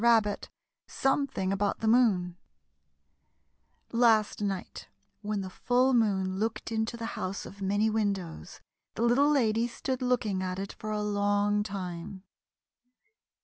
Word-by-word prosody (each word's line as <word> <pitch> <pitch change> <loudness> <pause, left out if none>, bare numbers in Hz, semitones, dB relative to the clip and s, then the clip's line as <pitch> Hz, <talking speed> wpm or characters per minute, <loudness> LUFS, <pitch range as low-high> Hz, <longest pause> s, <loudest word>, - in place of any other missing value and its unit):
RABBIT 225 -3 +3 0.4
SOMETHING 270 -8 0
ABOUT 200 +1 0
THE 220 - 0
MOON 210 -7 +3 1.6
Last 225 -3 +3
night 195 -3 -4 0.3
when 210 -1 -2
the 190 - -5
full 255 +6 +2
moon 190 -5 +1
looked 225 +1 -2
into 220 +1 -1
the 230 - -5
House 185 +2 -4
of 200 +1 -11
Many 205 +3 +2
Windows 200 -6 -2 0.3
the 230 - -1
Little 255 +5 +4
Lady 235 -5 +2
stood 260 +2 -4
looking 240 -6 0
at 185 0 -3
it 195 +1 -5
for 215 - -7
a 210 -1 -1
long 205 0 +1
time. 190 -2 -6
210 Hz, 130 wpm, -29 LUFS, 195-235 Hz, 1.6 s, Little